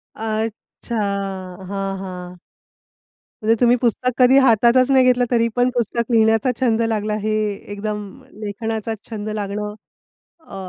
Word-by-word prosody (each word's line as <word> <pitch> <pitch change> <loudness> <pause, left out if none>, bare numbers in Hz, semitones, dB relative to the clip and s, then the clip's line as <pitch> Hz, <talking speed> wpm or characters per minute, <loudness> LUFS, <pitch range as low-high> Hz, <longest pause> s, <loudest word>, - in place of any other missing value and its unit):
अच्छा! 220 +1 -4 0.7
हां, 195 -1 -3
हां. 180 -1 -8 1.1
म्हणजे 225 +1 +3
तुम्ही 245 0 +5
पुस्तक 250 +1 +1
कधी 255 +1 +6
हातातच 245 +1 +4
नाही 260 -1 +6
घेतलं, 250 -1 +4
तरी 230 -1 +3
पण 245 +1 +3
पुस्तक 235 0 -1
लिहिण्याचा 225 +2 +3
छंद 230 -3 +2
लागला. 215 -2 0
हे 215 0 0 0.4
एकदम 210 +1 -3 0.4
लेखनाचा 220 +1 -3 0.2
छंद 215 -1 -5
लागणं 210 0 -3 0.7
अ, - - -12
225 Hz, 125 wpm, -20 LUFS, 210-240 Hz, 1.1 s, कधी